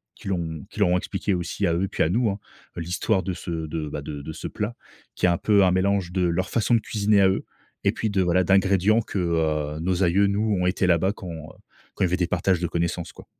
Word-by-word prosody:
qui - - -8
l'ont 85 -4 -3
qui 110 - -10
leur 100 - +4
ont 90 - +3
expliqué 95 +2 -2
aussi 90 +3 -1
à 85 - +1
eux 85 +3 0
et - - 0
puis - - -3
à - - +2
nous, 115 +5 +2
hein, 100 +1 -3 0.4
l'histoire 90 +4 0
de 95 - -2
ce 85 +1 -7 0.2
de 75 -1 -4
bah 75 - -5
de 70 0 -6
de 75 - -7
ce 80 - -6
plat 105 +3 -4 0.4
qui - - 0
est - - +4
un 85 - +2
peu 100 +1 +3
un 90 - +3
mélange 95 -1 +1
de 95 - 0
leur 90 +2 0
façon 115 +1 +1
de - - +3
cuisiner 105 -1 +2
à 95 - +6
eux 95 - -1 0.4
et - - +3
puis 110 - -2
de, 100 -1 +1
voilà, 90 0 +3
d'ingrédients 95 +3 +3
que, 105 - -6
heu, 80 -3 0
nos 90 +2 0
aïeux 95 +3 +3
nous 105 +1 +1
ont 90 - +1
été 90 0 +1
là-bas 90 +2 +3
quand, 95 - -10
heu, 80 -1 -6 0.6
quand - - -1
il - - +4
y - - -4
avait - - +3
des 90 -2 0
partages 90 +1 +1
de 85 - 0
connaissances, 85 +1 -2
quoi. - - -13
90 Hz, 270 wpm, -24 LUFS, 85-100 Hz, 0.6 s, à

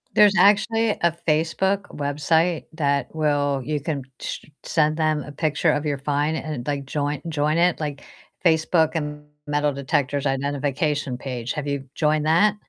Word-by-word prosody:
There's 210 -1 +7
actually 215 +4 +4
a 170 -4 +1 0.2
Facebook 165 +6 +1
website 155 +4 +1
that 140 -4 0
will 145 -3 +1
you 150 +3 -2
can 145 0 -3 0.2
sh - - -5 0.2
send 155 -1 +1
them 155 -2 +1
a 145 - -9
picture 150 0 +1
of 150 +1 -1
your 145 -2 -1
find 145 +2 0
and, 150 -7 -4
like, 140 -2 -2
join 145 0 -2
join 150 0 +1
it, 175 0 +3
like, 150 -2 -4 0.4
Facebook 160 -1 +3
and 150 -2 -3 0.2
Metal 145 0 +1
Detectors 140 0 -1
Identification 140 0 -1
page. 125 -2 -4
Have 145 -1 -4
you 140 -1 -3
joined 155 0 +1
that? 180 +7 +4
150 Hz, 155 wpm, -23 LUFS, 140-160 Hz, 0.4 s, There's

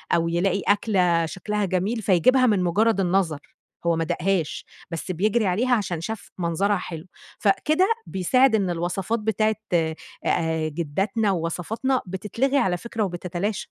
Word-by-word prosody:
أو 165 0 +1
يلاقي 185 +3 +1
أكلة 180 -5 +2
شكْلها 205 +4 -2
جميل، 190 +5 -1
فيجيبها 215 +7 +4
من 205 -6 +3
مجرد 205 +4 +2
النظر. 180 -5 +1 0.5
هو 170 -1 +3
ما 165 - 0
داقهاش، 175 -1 -1 0.3
بس 165 +3 -4
بيجري 210 +5 +1
عليها 240 +8 +2
عشان 180 -7 -2
شاف 220 +5 -6
منظرها 180 +4 +1
حلو. 170 -1 -7 0.3
فكده، 310 - +2 0.2
بيساعد 230 +6 +3
إن 195 -4 +1
الوصفات 175 +6 -1
بتاعة 215 0 +1 0.2
آآ 160 0 -1
جداتنا 195 +8 -1
ووصفاتنا، 190 +10 -1
بتتلغي 215 +9 -1
على 185 -9 +2
فكرة 225 +3 -3
وبتتلاشى. 180 +2 -3
190 Hz, 135 wpm, -24 LUFS, 170-220 Hz, 0.5 s, فيجيبها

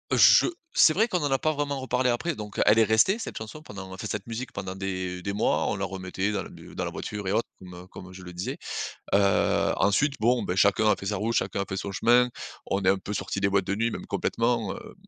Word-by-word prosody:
je - - +7 0.3
c'est 155 - +6
vrai 220 +7 +3
qu'on 180 -6 0
en 145 - 0
a 135 - +3
pas 155 - +1
vraiment 145 -2 -2
reparlé 125 0 0
après. 150 +7 -1
Donc, 105 -1 -8
heu, - - +4
elle 105 +2 +6
est - - +7
restée, 110 - +3
cette - - -6
chanson, 110 +8 -8
pendant 100 -9 -9
en 95 - -8
fait - - -5
cette 100 -2 -4
musique 115 +3 -5
pendant 95 -1 -5
des 95 -2 -4
des 100 +2 -3
mois. 105 - +1
On - - -1
la 95 0 -2
remettait 95 +1 -3
dans 100 -2 -1
le - - -10
b - - -13
dans - - -3
la - - -2
voiture 105 -2 -5
et - - 0
autres 110 +3 +1
comme, 90 -1 -11
heu, 90 +1 -11
comme 95 0 -11
je 95 0 -11
le 90 - -9
disais, 90 +2 -4 0.6
heu, 100 -1 +3
ensuite 135 +9 +2
bon, 120 +2 +3
beh, 90 - -2
chacun 100 +2 +4
a 105 - +4
fait 100 - -7
sa 105 - -1
route, 110 +4 -1
chacun 95 -2 0
a - - -2
fait 95 - -4
son 100 +1 -4
chemin, 120 +5 +4 0.4
on 100 - 0
est 95 - +4
un 95 - +3
peu 100 +2 -6
sortis 100 - -3
des 100 - +3
boîtes 100 -1 +1
de 100 - -1
nuit, 115 +2 0
même - - -6
complètement, 115 -3 0
hem, - - -11
105 Hz, 275 wpm, -26 LUFS, 95-120 Hz, 0.6 s, je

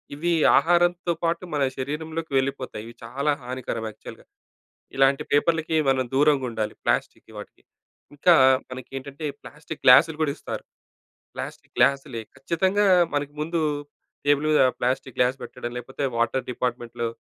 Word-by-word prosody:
ఇవి 170 +4 -1 0.3
ఆహారంతో 175 +1 +2
పాటు 170 +2 0
మన 145 -2 +1
శరీరంలోకి 155 +3 -4
వెళ్ళిపోతాయి. 130 -5 -2
ఇవి 115 - -10
చాలా 140 +6 -1
హానికరం 125 -3 -4
యాక్చువల్‌గా. 110 - -12 0.7
ఇలాంటి 135 0 +3
పేపర్లకి 160 +2 +2
మనం 130 -1 +2
దూరంగా 145 -1 +3
ఉండాలి 110 -2 -3
ప్లాస్టిక్ - - -1
వాటికి. - - -11 0.5
ఇంకా 170 +4 +5 0.3
మనకేంటంటే, 135 +3 -7 0.2
ప్లాస్టిక్ - - -10
గ్లాసులు 160 -2 +7
కూడా 145 -3 +1
ఇస్తారు. - - -6 0.7
ప్లాస్టిక్ - - -8
గ్లాసులే, 135 -3 +2 0.2
ఖచ్చితంగా 190 +8 +1 0.3
మనకి 145 0 -2
ముందు 165 +1 -1 0.7
టేబుల్ 145 +1 +3
మీద 155 - +5 0.2
ప్లాస్టిక్ 125 0 -1
గ్లాస్ 125 +2 +2
పెట్టడం, 120 - -7
లేకపోతే 130 +3 -6
వాటర్ 120 +3 0
డిపార్ట్మెంట్‌లో 120 -1 -3
140 Hz, 125 wpm, -24 LUFS, 130-160 Hz, 0.7 s, గ్లాసులు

